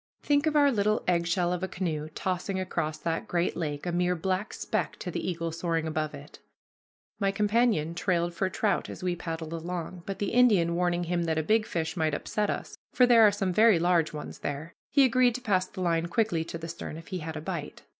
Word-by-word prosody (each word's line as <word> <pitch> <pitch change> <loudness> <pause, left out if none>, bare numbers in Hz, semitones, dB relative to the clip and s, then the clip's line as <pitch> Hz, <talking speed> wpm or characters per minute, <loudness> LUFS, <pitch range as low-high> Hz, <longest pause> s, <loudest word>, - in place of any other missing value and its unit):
Think 290 +1 +2
of 305 - +1
our 285 -1 +5
little 215 -2 +1
eggshell 175 0 +1
of 180 - -3
a 190 - -1
canoe 155 -5 -3
tossing 185 +1 -2
across 160 -4 -2
that 165 +1 -3
great 175 0 0
lake, 150 -3 -3
a 175 - -1
mere 180 +1 +1
black 185 +4 -2
speck - - -2
to - - -5
the - - -3
eagle 165 -1 -3
soaring 165 -1 -1
above 155 -1 -2
it! - - -12 0.8
My 200 -2 +2
companion 205 -5 +2
trailed 175 -1 0
for 190 +2 0
trout 210 +2 0
as - - -8
we 180 -1 0
paddled 165 -2 -5
along, 175 +1 -5
but, 195 -1 -3
the 205 - -2
Indian 210 -9 +4
warning 175 0 +1
him 175 0 -1
that 160 -1 0
a 160 - +1
big 215 +6 +2
fish 160 0 -2
might 160 -3 +1
upset 210 -1 -1
us, - - -4 0.2
for 250 - +5
there 240 -2 +6
are 215 -2 +7
some 195 -3 -1
very 220 0 +6
large 170 -1 +2
ones 150 -1 -7
there, 145 +4 -5 0.2
he 280 - +5
agreed 250 -1 +4
to 250 - -4
pass 185 -5 +1
the 185 - -8
line 170 -1 +1
quickly 175 -3 +1
to 165 - -6
the 165 0 -7
stern 165 -1 -6
if 165 - -11
he 185 -2 -3
had 160 0 -5
a - - -5
bite. 165 -3 -5
175 Hz, 225 wpm, -28 LUFS, 165-205 Hz, 0.8 s, are